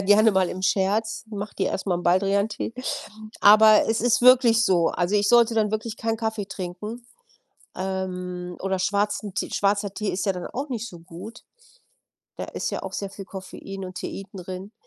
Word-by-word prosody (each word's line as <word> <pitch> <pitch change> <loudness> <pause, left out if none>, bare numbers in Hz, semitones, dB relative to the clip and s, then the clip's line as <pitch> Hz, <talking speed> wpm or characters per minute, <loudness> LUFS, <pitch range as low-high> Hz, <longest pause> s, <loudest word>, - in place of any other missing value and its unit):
gerne 205 +3 +5
mal 190 -2 +2
im 185 - -6
Scherz: 210 +5 0
„Mach 205 -1 -5
dir 190 - 0
erst 190 - -4
mal 185 - +1
n' 175 - -5
Baldriantee.“ 200 +5 +1 0.7
Aber 215 +1 +7
es 225 - +1
ist 245 0 +3
wirklich 245 -2 +6
so. 175 -5 +3
Also, 180 +3 0
ich 205 0 +3
sollte 235 -1 +5
dann 215 -2 +1
wirklich 220 +1 -3
keinen 225 0 -1
Kaffee 220 -2 -2
trinken, 200 +5 -7 0.7
ähm, 180 -2 -4
oder 190 0 -1
schwarzen 205 +1 -1
T - - -2
schwarzer 200 0 0
Tee 210 0 -2
ist 190 - -3
ja 195 - +3
dann 180 -1 -6
auch 275 +4 -5
nicht 235 -3 -4
so 175 - -12
gut. 175 +6 -10 1.0
Da - - -5
ist - - -4
ja - - -4
auch - - -6
sehr 200 - -3
viel 195 0 -9
Koffein 195 +1 -8
und 185 0 -8
Teein 195 - -6
drin. 185 +1 -7
200 Hz, 185 wpm, -24 LUFS, 185-220 Hz, 1.0 s, Aber